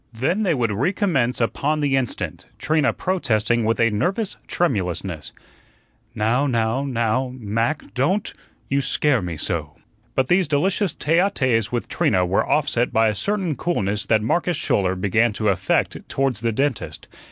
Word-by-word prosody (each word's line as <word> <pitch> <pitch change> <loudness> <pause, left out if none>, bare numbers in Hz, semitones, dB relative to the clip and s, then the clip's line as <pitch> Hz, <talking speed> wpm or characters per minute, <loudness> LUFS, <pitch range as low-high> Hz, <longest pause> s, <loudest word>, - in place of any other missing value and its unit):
Then 135 - 0
they 180 -7 +2
would 115 -4 0
recommence 140 - 0
upon 145 +6 0
the 140 -2 +1
instant, 130 -3 -3
Trina 155 -2 +1
protesting 120 - 0
with 115 +2 +1
a 115 -1 +3
nervous 185 - -1
tremulousness: 90 - -1 0.8
"Now 120 +6 +1
now 115 +1 0
now, 125 -1 0
Mac, 115 +6 -2
DON'T; 175 +11 0 0.3
you 140 +1 +1
SCARE 135 -3 +2
me 85 -3 -5
so." - - -3 0.4
But 130 -1 +2
these 180 +2 +3
delicious 180 +5 +1
tete 165 +3 +2
a 195 +3 +3
tetes 125 - 0
with 120 -1 -2
Trina 90 0 +1
were 90 +2 +1
offset 125 -5 +1
by 110 0 +3
a - - -1
certain 190 - -1
coolness 105 - -1
that 110 -2 +3
Marcus 175 +9 0
Schouler 95 -2 +1
began 105 +5 +1
to 110 0 0
affect 95 -1 +1
towards 135 -5 0
the 115 -1 +1
dentist. 135 +1 -2
125 Hz, 155 wpm, -22 LUFS, 110-155 Hz, 0.8 s, a